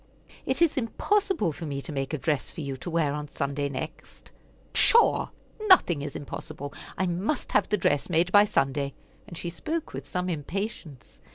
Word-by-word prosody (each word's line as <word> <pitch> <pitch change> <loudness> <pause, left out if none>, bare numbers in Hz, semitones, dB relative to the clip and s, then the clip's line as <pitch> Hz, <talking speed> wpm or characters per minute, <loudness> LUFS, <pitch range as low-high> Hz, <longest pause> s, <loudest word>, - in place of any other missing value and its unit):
It - - +2
is 330 - +2
impossible 380 - +1
for 160 +2 -7
me 140 -1 -3
to - - -6
make 135 -2 -2
a 155 - -1
dress 150 +1 -1
for 165 - -7
you 140 -2 -3
to 130 +7 -7
wear 160 -4 +1
on 150 0 -4
Sunday 140 -1 -2
next." 140 +4 -8 0.4
"Pshaw! 470 0 +5 0.4
Nothing 180 - +6
is 145 0 -5
impossible. 145 0 -6 0.2
I 190 - +1
must 185 - -2
have 210 - +2
the 210 - +2
dress 145 -5 +1
made 175 +1 +2
by 205 +1 +7
Sunday;" 140 -6 0 0.3
and 170 - -9
she 170 - -4
spoke 315 - -4
with - - -6
some 180 0 -1
impatience. 170 - -5
165 Hz, 180 wpm, -27 LUFS, 145-205 Hz, 0.4 s, by